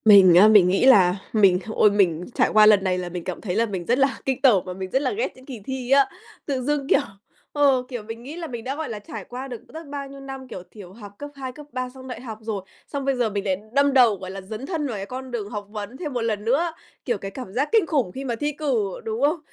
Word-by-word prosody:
Mình 195 -5 +8
á, 190 +4 +8
mình 210 -4 +7
nghĩ 195 +7 +2
là 195 -8 +6 0.2
mình 195 -5 +5
h 220 - -6
ôi, 210 - +5
mình 180 -4 +2
trải - - +3
qua 215 0 +7
lần 210 -2 +6
này 185 -1 +1
là 180 -1 -4
mình 175 -1 -6
cảm 185 - -5
thấy 185 -4 -3
là 230 +2 +3
mình 190 -5 -5
rất 245 +6 +2
là 275 0 +2
kinh 265 -2 -1
tởm 230 -9 +5
và 185 - -5
mình 190 0 -6
rất 265 - +2
là 280 - 0
ghét 440 +4 -2
những 260 - -16
kỳ 255 -5 -8
thi 265 -1 -4
á. 275 0 +5 0.4
Tự 270 -3 -2
dưng, 285 +1 -1
kiểu, - - +5 0.5
ờ, 275 -3 +3
kiểu, 245 -4 -5
mình 225 +2 -8
nghĩ 285 +5 -8
là 340 -1 -5
mình 235 -4 -6
đã 265 +3 -3
gọi 315 +1 -4
là 215 -2 -5
trải 205 -1 -8
qua 255 +2 -7
được 245 -3 -7
rất 320 -1 -10
bao 280 -1 -5
nhiêu 275 0 -11
năm, 270 -1 -8
kiểu, 185 -7 -8
thiểu 190 -4 -12
học 205 -2 -11
cấp 290 - -6
2, 260 -1 -4
cấp 300 - -11
3, 255 0 -3
xong 260 0 -12
đại 250 -2 -7
học 225 -4 -7
rồi, 215 -3 -3 0.3
xong 280 -2 -4
bây 275 -1 +1
giờ 240 -3 +1
mình 200 -1 -3
lại 190 -2 +1 0.2
đâm 280 0 +3
đầu, 245 -5 +6
gọi 185 -1 -8
là, 195 0 -7
dấn 215 +6 -7
thân 305 -2 -2
vào 240 - -4
cái 195 - -5
con 255 +3 -7
đường 215 -4 -4
học 205 -2 -6
vấn 210 +3 -6
thêm 300 -4 -5
một 245 - -1
lần 215 -2 -2
nữa. 300 +9 +2 0.3
Kiểu, 240 -4 0
cái 195 0 -7
cảm 250 -6 -8
giác 275 +6 0
kinh 440 -5 +4
khủng 275 - 0
khi 270 - -6
mà 240 -3 -1
thi 295 +6 -1
cử, 255 -10 -2
đúng 220 +2 -3
không? 300 +4 +2
240 Hz, 290 wpm, -23 LUFS, 205-275 Hz, 0.5 s, Mình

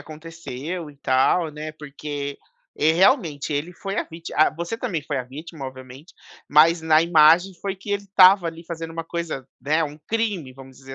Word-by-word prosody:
aconteceu 160 0 -7
e 145 - -19
tal, 140 +5 +2
né, 150 +1 -6
porque" 145 -1 -6 0.4
é 160 +1 +3
realmente, 170 - +2
ele 150 +5 -2
foi 195 +4 -6
a - - 0
víti 165 0 -10
ah, 155 - +5
você 170 +7 -5
também 180 - -3
foi 145 -2 -3
a 125 - -4
vítima, 145 +2 -9
obviamente, 130 +4 -12 0.3
mas 160 +3 +5
na 155 -1 +5
imagem 170 +3 +5
foi 195 -1 -3
que 205 +2 -9
ele 200 0 -1
estava, 190 -2 +6
ali, 165 +1 -6
fazendo 165 -1 -6
uma 165 0 -5
coisa, 165 -6 -5
né, 155 +3 +1
um 150 0 -7
crime, 210 - -1
vamos 135 0 -14
dizer 135 0 -10
160 Hz, 185 wpm, -23 LUFS, 145-175 Hz, 0.4 s, estava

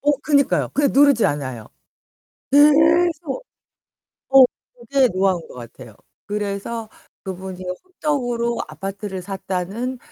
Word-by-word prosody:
어 290 - +2
그니까요. 280 -3 +2
그냥 285 -1 +2
누르지 280 -4 +5
않아요. 130 -6 -4 0.8
계속 320 - +4 0.8
어 270 0 +8 0.3
그게 255 +2 +1
노하우인 185 -3 +1
것 - - -13
같아요. 120 -1 -11 0.3
그래서 210 +2 -4 0.4
그분이 185 0 -7 0.2
호떡으로 245 -9 -2
아파트를 195 -1 -6
샀다는 195 +6 -4
230 Hz, 255 characters per minute, -21 LUFS, 190-280 Hz, 0.8 s, 어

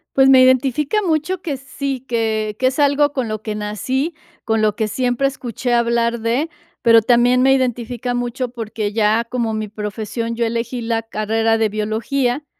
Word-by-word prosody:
Pues 270 0 +5
me 260 -1 +7
identifica 270 - +3
mucho 330 +2 0
que 300 -7 -3
sí, 275 0 -4
que 220 -3 -1
que 255 - +2
es 260 +3 -2
algo 290 0 +3
con 260 -5 -2
lo 215 -1 -4
que 215 -1 -4
nací, 235 - -2 0.3
con 225 -1 +1
lo 210 -2 +2
que 220 - 0
siempre 250 +4 0
escuché 245 -2 -3
hablar 235 0 +1
de, 245 +8 0 0.3
pero 230 -1 +6
también 245 +2 +3
me 265 +1 +5
identifica 245 -1 -1
mucho 245 +1 -2
porque 220 -3 -4
ya 220 +1 +2
como 230 -2 -2
mi 215 0 -3
profesión, 215 +2 -4
yo 235 0 0
elegí 235 +2 -2
la 225 -1 -1
carrera 225 0 0
de 220 -1 +2
biología 235 +6 -1
235 Hz, 175 wpm, -19 LUFS, 220-260 Hz, 0.3 s, me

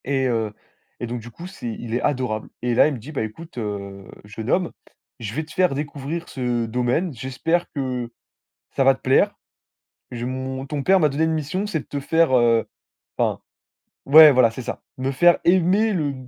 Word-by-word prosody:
Et 135 -1 0
heu, 115 -3 -1 0.5
et 120 - -4
donc 120 +1 -4
du 120 - -10
coup, 170 +9 -9
c'est 185 -10 -8
il 115 0 -6
est 120 - 0
adorable 125 -6 -1
et 120 0 0
là, - - +6
il 155 - -1
me - - -5
dit: 135 +8 -10
«Bah, 145 - -3
écoute, 125 +8 -9
heu, 100 -3 -5 0.2
jeune 110 +3 -7
homme, 180 -2 +1 0.5
je 110 -2 -5
vais 155 +5 -2
te 160 - -14
faire 185 -5 +2
découvrir 145 +3 -5
ce 125 -3 -1
domaine, 125 +9 -1
j'espère 135 +8 -1
que 125 -4 -3 0.6
ça 135 - 0
va 135 0 +6
te - - -16
plaire. 130 +1 +3 0.8
Je 120 -1 -4
mon 130 +1 -4
ton 140 0 -4
père 190 +4 +4
m'a 155 -3 +3
donné 145 +3 -1
une 160 - +2
mission, 160 +6 -2
c'est 205 -6 -2
de - - -19
te 145 - -4
faire», 160 0 +2
heu, 115 -1 +3 0.5
enfin - - 0 0.7
ouais, 155 +2 +9
voilà 125 -4 +4
,c'est 130 - -7
ça, 125 - -6 0.2
me 130 +1 -1
faire 175 +6 +5
aimer 190 +5 +3
le 150 -6 -1
130 Hz, 205 wpm, -22 LUFS, 120-160 Hz, 0.8 s, ouais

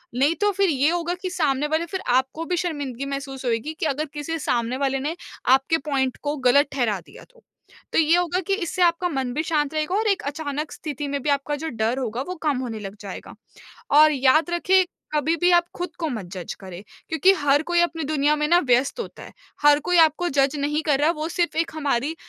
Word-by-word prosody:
नहीं 280 +6 +2
तो 415 0 +3
फिर 395 -1 +1
ये 285 0 +2
होगा 345 0 -1
कि 370 - -3
सामने 295 -5 0
वाले 315 +2 0
फिर 375 +3 -5
आपको 265 +6 +1
भी 355 +1 -1
शर्मिंदगी 285 -7 -3
महसूस 275 -1 -5
होएगी 240 +6 -1
कि - - -1
अगर 300 +1 -1
किसी 305 +2 -4
सामने 240 -2 -1
वाले 270 -1 0
ने 300 +5 -3 0.4
आपके 270 +5 +1
पॉइंट 265 -3 0
को 290 0 -1
गलत 285 +4 +5
ठहरा 230 -7 0
दिया 165 - -15
तो। - - -24 0.5
तो - - +4
ये 320 +1 +4
होगा 355 0 0
कि 395 - +1
इससे 370 -2 -3
आपका 345 +1 +2
मन 265 -5 -2
भी 305 +4 -1
शांत 300 -2 0
रहेगा 310 +4 -1
और 435 +2 +1
एक 400 -2 +1
अचानक 295 0 -4
स्थिति 295 -2 -5
में 280 0 -2
भी 300 - -1
आपका 285 +1 0
जो 320 +2 -5
डर 225 0 -1
होगा, 240 -1 -3
वो 360 +7 -5
कम 295 -4 +1
होने 235 -4 -4
लग 200 -1 -7
जाएगा 200 -2 -8 0.6
और 305 0 +8
याद 280 +4 +3
रखें, 370 +2 +3 0.3
कभी 305 +2 +1
भी 350 +3 +3
आप 345 -1 +5
खुद 355 0 -4
को 325 - -1
मत 220 -8 -4
जज 180 -3 -6
करें 185 -1 -9 0.3
क्योंकि 320 +4 +4
हर 285 0 +3
कोई 345 +1 +1
अपनी 335 -2 -1
दुनिया 295 0 +2
में 300 - 0
ना 345 +1 +6
व्यस्त 250 - +2
होता 470 - -7
है। - - -12 0.3
हर 295 0 +6
कोई 360 - +3
आपको 325 +2 +4
जज 275 0 +2
नहीं 295 +2 0
कर 290 -3 +2
रहा, 300 +3 +3
वो 310 -1 -4
सिर्फ़ 345 -1 -1
एक 330 0 0
हमारी 290 0 -1
295 Hz, 225 wpm, -23 LUFS, 270-335 Hz, 0.6 s, और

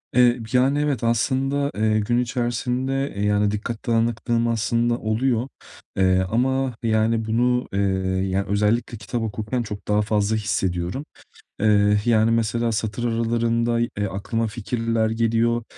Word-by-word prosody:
Eee, 125 -1 +5
yani, 135 +3 +3
evet, 145 -6 -1
aslında, 135 +4 0
eee, 110 0 +2
gün 120 +3 0
içerisinde, 125 +3 -1
eee, 100 +1 -1
yani, 105 0 +2
dikkat 110 +3 -5
dağınıklığım 115 0 +1
aslında 115 +1 +1
oluyor. 120 +3 0 0.5
Eee, 95 -1 +3
ama, 130 +1 0
yani, 110 0 +1
bunu, 125 +2 +1
eee, 100 - 0 0.5
ya 100 +1 0
özellikle 105 +3 0
kitap 105 +3 -4
okurken 110 +2 -3
çok 105 -2 -8
daha 105 0 +2
fazla 105 0 0
hissediyorum. 95 +3 -2 0.5
Eee, 105 -1 +4
yani, 115 -1 +3
mesela 115 +1 0
satır 110 +2 -3
aralarında, 115 0 0
eee, 105 -4 -2
aklıma 115 +4 -2
fikirler 115 0 -1
geliyor, 115 +1 +1
115 Hz, 135 wpm, -23 LUFS, 105-120 Hz, 0.5 s, Eee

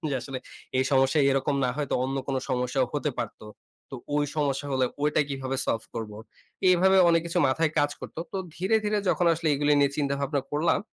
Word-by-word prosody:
যে - - -1
আসলে 135 0 -6 0.4
এই 130 - +3
সমস্যায় 135 +2 +4
এরকম 135 +1 +1
না 125 - +1
হয়েতো 145 -2 -2
অন্য 135 +1 -2
কোনো 135 -1 -1
সমস্যাও 125 +1 0
হতে 145 0 -1
পারত। 115 - -4 0.5
তো - - -7 0.2
অই 150 - +2
সমস্যা 140 -2 0
হলে 130 -1 +2 0.2
ওইটা 150 +1 +2
কিভাবে 135 -1 -3
সলভ 115 - 0
করব? 110 -2 -5 0.6
এভাবে 190 +2 +4
অনেক 165 0 +4
কিছু 170 - -1
মাথায় 155 +4 +1
কাজ 145 0 +3
করত। - - -9 0.2
তো - - -3 0.2
ধীরে, 190 +5 +2
ধীরে 210 0 +1
যখন 175 - +2
আসলে 165 0 -2
এগুলি 145 +1 +2
নিয়ে 140 -1 +3
চিন্তা 140 -2 0
ভাবনা 140 0 0
করলাম, 150 +3 +2
140 Hz, 200 wpm, -26 LUFS, 135-155 Hz, 0.6 s, সমস্যায়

